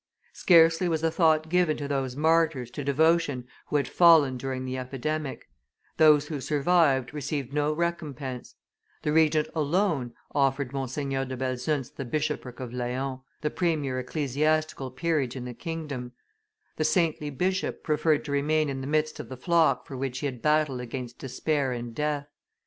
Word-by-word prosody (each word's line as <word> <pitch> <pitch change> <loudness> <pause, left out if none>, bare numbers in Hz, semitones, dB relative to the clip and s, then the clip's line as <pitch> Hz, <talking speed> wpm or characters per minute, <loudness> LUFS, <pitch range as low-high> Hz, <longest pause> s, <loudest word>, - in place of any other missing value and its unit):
Scarcely 165 0 +5
was 160 -1 -1
a 165 - +2
thought 160 -2 +3
given 175 -2 +2
to 145 - -4
those 135 -3 -2
martyrs 155 -5 +2
to 145 - -5
devotion 145 -2 +2 0.2
who - - -3
had 140 -3 +2
fallen 160 -6 +6
during 130 0 -4
the 130 0 -3
epidemic; 135 +3 -4 0.5
those 150 -2 +6
who 150 -3 -4
survived 145 -3 +2
received 140 -2 -4
no 150 0 +1
recompense; 150 -6 -4 0.5
the 150 - 0
Regent, 155 -1 +3
alone, 155 -5 0 0.2
offered 135 -1 +1
Monseigneur 135 0 -2
de 130 0 -6
Belzunce 130 +2 -2
the 135 - -6
bishopric 135 -2 -3
of 125 -2 -6
Laon, 130 +2 -3 0.2
the 150 - -1
premier 150 -7 0
ecclesiastical 150 +1 -1
peerage 135 -2 -1
in 125 -2 -5
the 125 - -6
kingdom; 145 -6 -5 0.6
the 155 - +1
saintly 155 -3 +1
bishop 185 +6 -1
preferred 155 0 +1
to 145 - -5
remain 150 +2 +1
in 135 -1 -4
the 135 - -5
midst 155 +1 0
of - - -7
the 130 - -7
flock 155 -4 +2
for 135 - -8
which 130 -1 -3
he 140 - -4
had 125 -4 -4
battled 150 -3 +2
against 125 0 -6
despair 135 +1 -1
and 120 -1 -5
death. 145 +2 -2
145 Hz, 160 wpm, -27 LUFS, 130-155 Hz, 0.6 s, fallen